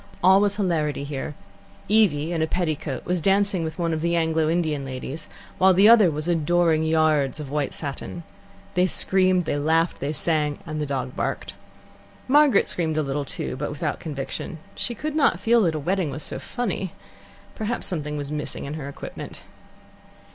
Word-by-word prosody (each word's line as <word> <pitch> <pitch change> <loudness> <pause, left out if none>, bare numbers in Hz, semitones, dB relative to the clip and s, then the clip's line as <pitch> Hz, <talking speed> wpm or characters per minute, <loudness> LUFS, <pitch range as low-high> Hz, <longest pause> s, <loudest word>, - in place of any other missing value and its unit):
All 190 +2 +7
was 205 -1 +2
hilarity 160 -8 0
here. 140 0 -5 0.5
Evie, 175 -7 +3
in 165 - -1
a 160 - +2
petticoat, 155 -6 -2
was 180 -1 0
dancing 195 -1 +2
with 160 -1 -4
one 170 -2 0
of 155 - -2
the 170 +1 +1
Anglo 160 -1 +1
Indian 160 -4 0
ladies, 135 +4 -6 0.3
while 185 0 +6
the 195 +3 +6
other 220 -5 +7
was 155 +1 -4
adoring 170 -1 +2
yards 155 -3 +2
of 145 -3 -6
white 145 -2 -1
satin. 145 +3 -6 0.5
They 180 +1 +3
screamed, 185 -1 +2
they 145 -2 -1
laughed, 165 +3 +1
they 140 +2 -2
sang, 150 -1 0
and 155 -2 -4
the 150 - -2
dog 130 -2 -3
barked. - - -3 0.7
Margaret 285 -5 +5
screamed 160 -3 -1
a 155 - +2
little 140 +1 -2
too, - - -3
but 145 +3 -3
without 145 +1 -3
conviction. 150 +2 -5 0.2
She 240 - -3
could 305 +6 -4
not 310 - +3
feel 235 +1 +4
that 165 -5 +2
a - - -1
wedding 180 +2 0
was 140 +2 -6
so - - -6
funny. 200 -7 -3 0.6
Perhaps 220 +2 -2
something 150 -4 -1
was 145 0 -5
missing 150 -1 -4
in 140 - -5
her 145 -3 -5
equipment. 140 - -8
160 Hz, 180 wpm, -24 LUFS, 150-185 Hz, 0.7 s, All